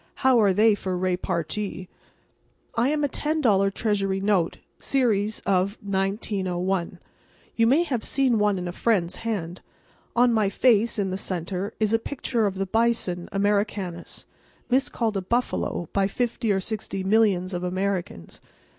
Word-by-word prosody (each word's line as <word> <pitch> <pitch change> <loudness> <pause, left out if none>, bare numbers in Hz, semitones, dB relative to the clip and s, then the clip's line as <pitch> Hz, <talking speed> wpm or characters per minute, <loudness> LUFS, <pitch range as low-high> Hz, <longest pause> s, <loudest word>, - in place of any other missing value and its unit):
How 255 -3 +6
are 200 -2 +4
they 215 +3 +4
for 190 -2 -3
repartee? 185 +1 -2 0.9
I 235 +3 +2
am 300 0 0
a - - +3
ten 305 +3 -1
dollar 195 -8 +3
Treasury 195 -2 0
note, 195 -4 +1 0.2
series 220 -6 +1
of 195 +2 +1
1901. 190 -2 -1 0.6
You 230 0 +3
may 285 +8 +4
have 255 -9 -2
seen 260 -5 +1
one 205 -1 +2
in 180 -1 -4
a - - -3
friend's 185 -3 0
hand. 190 -6 -4 0.5
On 240 0 +4
my 215 -3 +2
face, 230 +1 +3
in 195 -2 -1
the 190 - -3
centre, 185 +3 -4
is 215 0 +1
a 225 - +4
picture 235 -3 -1
of 195 - -3
the 195 0 -1
bison 225 -5 0
Americanus, 200 -3 -1 0.5
miscalled 235 -4 +1
a - - -1
buffalo 230 -4 -1
by 195 -1 +2
fifty 235 +1 -1
or 195 - +2
sixty 195 -1 -4
millions 195 -3 +2
of 180 0 -3
Americans. 180 - -3
200 Hz, 150 wpm, -25 LUFS, 185-230 Hz, 0.9 s, How